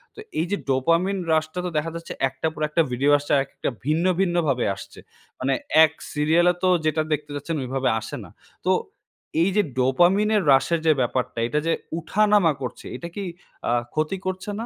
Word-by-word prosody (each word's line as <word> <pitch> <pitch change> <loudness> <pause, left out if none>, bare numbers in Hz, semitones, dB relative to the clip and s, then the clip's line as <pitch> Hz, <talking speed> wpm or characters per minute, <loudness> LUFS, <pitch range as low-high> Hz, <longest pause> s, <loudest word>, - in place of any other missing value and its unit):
তো - - -12 0.2
এই 160 - +1
যে, 205 - +1
ডোপামিন 165 +9 +2 0.2
রাশটা 155 +2 0
তো - - -1
দেখা 160 +2 -1
যাচ্ছে 165 0 -6 0.2
একটা 135 +4 -3
পর 155 - -9
একটা 160 +2 +2
ভিডিও 140 +4 +2
আসছে 145 0 -6
আর 135 - +4
একটা - - -4 0.2
ভিন্ন, 155 +4 +1
ভিন্ন, 175 -3 +1
ভাবে 125 -3 +1
আসছে। - - -11 0.4
মানে 135 +1 +1 0.3
এক 155 - +4 0.2
সিরিয়ালে 165 +4 +3
তো 185 - +4 0.2
যেটা 155 0 +2
দেখতে 150 0 -4
যাচ্ছেন 145 +4 -3
ওইভাবে 130 +1 -1
আসে 115 - -7
না। - - -12 0.4
তো - - +3 0.7
এই 180 - +3
যে, 210 - +5 0.2
ডোপামিন 175 +11 +3
এর 205 - +2
রাশের 150 +5 +3
যে, 160 - +6
ব্যাপারটা 125 -1 -1
এটা 150 - 0
যে, 165 - +3 0.3
উঠানামা 205 0 +3
করছে 125 -1 -6
এটা 130 +7 -6
কি 200 - -3 0.5
আ - - +2 0.2
ক্ষতি 155 +5 -1
করছে 185 +2 -3
না 230 - -3
155 Hz, 190 wpm, -24 LUFS, 135-180 Hz, 0.7 s, যে